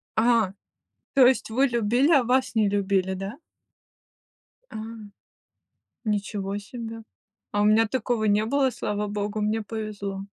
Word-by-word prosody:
А, 225 -4 +3 0.6
то 270 -2 +7
есть 260 -3 +1
вы 265 +5 +3
любили, 240 +5 +2
а 280 -5 +5
вас 250 0 +1
не 215 -2 +3
любили, 195 -2 +1
да? 195 +7 -6 1.3
А, - - -10 1.3
ничего 205 -2 -2
себе! 225 +1 -8 0.5
А 205 0 +1
у - - +3
меня 215 +2 +5
такого 235 -2 -1
не 210 0 +3
было, 275 +1 +2
слава 210 -3 -3
богу, 205 +1 -3
мне 215 +1 0
повезло. 205 -3 -5
215 Hz, 135 wpm, -25 LUFS, 205-240 Hz, 1.3 s, то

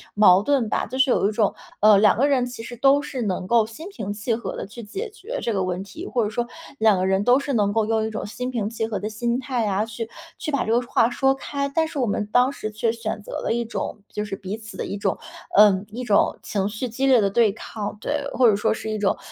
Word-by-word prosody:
矛 195 -2 +6
盾 265 -2 +1
吧， - - 0
就 260 - -5
是 265 -1 +4
有 200 - +3
一 - - -2
种， 210 -1 +1 0.3
呃， 210 -1 +7
两 210 - +5
个 280 +4 +3
人 260 -3 +2
其 245 -2 -8
实 240 - -7
都 275 +3 +5
是 260 -3 -5
能 185 -3 -2
够 225 0 +3
心 315 - -9
平 215 - -5
气 220 +3 -2
和 235 - -4
地 - - -4
去 235 +4 -10
解 400 - -5
决 455 +4 -6
这 230 - -1
个 190 -1 0
问 185 +1 -2
题， 320 - -9
或 240 -3 0
者 210 - -1
说 240 +2 -2 0.3
两 215 -3 +4
个 185 - 0
人 190 +1 +2
都 250 +4 +5
是 280 -1 -3
能 205 -3 +2
够 220 -1 +2
用 220 0 +1
一 - - -2
种 215 - -5
心 250 +4 -4
平 215 -4 -2
气 225 -1 -2
和 210 -4 -3
的 210 +2 -3
心 235 +3 -1
态 250 -4 -1
啊， 200 +2 +1
去 225 0 -6 0.3
去 305 - -4
把 280 - +1
这 220 - -1
个 240 +2 +3
话 230 - +3
说 270 +2 +2
开。 280 +1 -3
但 320 -1 +2
是 295 - -5
我 250 - +2
们 205 +1 -1
当 250 +2 +4
时 215 -5 -5
却 225 +2 0
选 225 -2 -4
择 - - -10
了 - - -1
一 235 0 -1
种 220 -2 -5
就 210 - -3
是 200 -1 -4
彼 195 +3 -5
此 220 -4 -11
的 - - -3
一 200 - -4
种， 195 -1 -1 0.4
呃， 200 -2 +6
一 245 +3 -5
种 210 -4 +2
情 200 -1 -1
绪 220 +4 -4
激 265 +4 -1
烈 255 -3 +6
的 200 - +2
对 220 0 +3
抗， 210 -1 -6
对。 290 +2 -2
或 245 -2 +5
者 205 - +3
说 210 +2 +1
是 220 - -5
一 215 - -2
种 205 -2 +1
225 Hz, 295 characters per minute, -23 LUFS, 205-250 Hz, 0.4 s, 呃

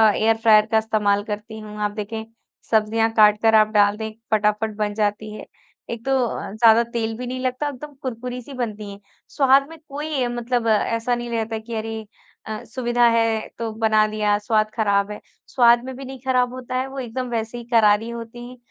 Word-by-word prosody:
Air 225 +1 +2
fryer 215 -1 +5
का 220 - +4
इस्तेमाल 210 -2 +1
करती 215 +1 -6
हूँ। 210 -1 -9
आप 210 0 0
देखें, 220 +1 -5 0.5
सब्जियाँ 225 +1 +2
काट 210 -1 +5
कर 225 -1 +4
आप 215 -1 +6
डाल 205 -1 +3
दें 220 0 -4 0.2
फटाफट 210 0 +1
बन 210 -1 -1
जाती 210 0 -2
है 215 - -9 0.4
एक 235 +1 -6
तो 270 - 0 0.2
अ, - - -5
ज़्यादा 225 +2 +5
तेल 230 -1 -3
भी 250 +1 -5
नहीं 255 +1 -4
लगता 255 +3 -2
एकदम 290 +2 -9
कुरकुरी 250 0 -5
सी 275 +3 -11
बनती 215 -5 -4
है। 200 - -11 0.3
स्वाद 275 0 +4
में 325 - -11
कोई 285 -2 -2
मतलब 240 0 -2
ऐसा 230 +2 +1
नहीं 240 0 -5
रहता 225 -1 -2
कि 225 +1 -7
अरे 220 0 -4 0.4
अ, 215 0 -5
सुविधा 240 0 0
है 225 -1 +1
तो 230 -1 -3
बना 215 -1 +4
दिया 210 -1 +1
स्वाद 215 0 +1
ख़राब 200 -2 +1
है। 210 - -7 0.3
स्वाद 240 -1 +5
में 260 -1 -6
भी 275 - -8
नहीं 265 0 -8
ख़राब 250 -1 +1
होता 255 0 -6
है 255 +1 0
वो 270 0 -7
एकदम 250 0 -4
वैसे 225 0 -3
ही 240 - -7
करारी 220 -1 +4
होती 235 +1 -8
हैं 250 - -12
225 Hz, 200 wpm, -22 LUFS, 215-245 Hz, 0.5 s, आप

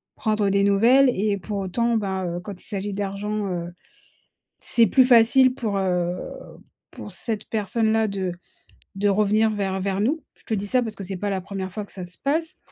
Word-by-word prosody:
prendre 215 -2 0
des 200 0 +2
nouvelles 235 +7 +5
et 205 -2 0
pour 200 +2 -5
autant, 230 +5 0
ben, 190 -3 -2
heu, 175 0 -3
quand 195 -1 -9
il - - -14
s'agit 205 -2 -4
d'argent, 205 +1 -3
heu, 175 -1 -4 0.9
c'est 230 -1 +3
plus 255 +7 +5
facile 250 +1 +5
pour, 215 -6 -2
heu, 180 -2 0 0.8
pour - - -9
cette 225 -4 -4
personne-là 220 +1 +1
de 190 -2 -2 0.6
de 205 +1 +1
revenir 215 +2 +3
vers 195 -2 -2
vers 195 0 -1
nous. 295 +9 0
Je - - -25
te 225 - -3
dis 205 0 -3
ça 255 +3 +2
parce 220 -3 -5
que 195 - -7
c’est 190 0 -5
pas 205 +2 -2
la 190 -1 -1
1re 190 0 -5
fois 210 -1 -4
que - - -18
ça 185 - -7
se 180 +1 -7
passe, 320 +4 -1
205 Hz, 200 wpm, -24 LUFS, 195-225 Hz, 0.9 s, nouvelles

